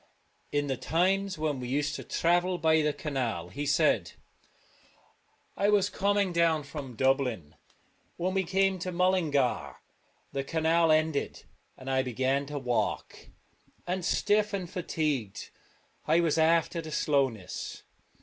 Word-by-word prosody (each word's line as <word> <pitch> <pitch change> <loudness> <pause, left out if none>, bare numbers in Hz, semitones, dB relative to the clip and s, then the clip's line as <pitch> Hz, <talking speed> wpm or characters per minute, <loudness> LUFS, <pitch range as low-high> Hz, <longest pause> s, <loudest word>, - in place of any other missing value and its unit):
' - - -41
In 145 0 0
the 135 -2 -2
times 190 +5 0
when 155 -3 -1
we 125 - -5
used 145 +3 -1
to - - -5
travel 175 +2 +1
by 160 -1 +3
the 150 0 +1
canal,' 125 - -3
he 145 +11 -4
said, 140 - +2 0.7
' - - -30 0.7
I 200 - +2
was 205 -1 +3
coming 200 -1 +1
down 165 -2 +2
from 140 -3 -8
Dublin. 125 - 0 0.6
When 185 +2 -1
we 195 - +2
152 180 -1 -8
came 195 -1 +2
to 185 +1 -4
Mullingar 170 -8 +1 0.5
the 135 - -2
canal 165 +2 +2
ended, 155 -2 0 0.3
and 130 - -12
I 130 0 +2
Drumcliff - - -6
began 130 +3 0
to 145 0 -5
walk, 125 -3 -2 0.6
and 180 +1 -2
stiff 210 +3 +1
and 190 -3 -2
fatigued 150 - -3 0.6
I 160 +2 +4
was 165 -2 +1
after 165 +1 +2
the 160 - -8
slowness. 135 -11 -1
155 Hz, 150 wpm, -29 LUFS, 135-180 Hz, 0.7 s, I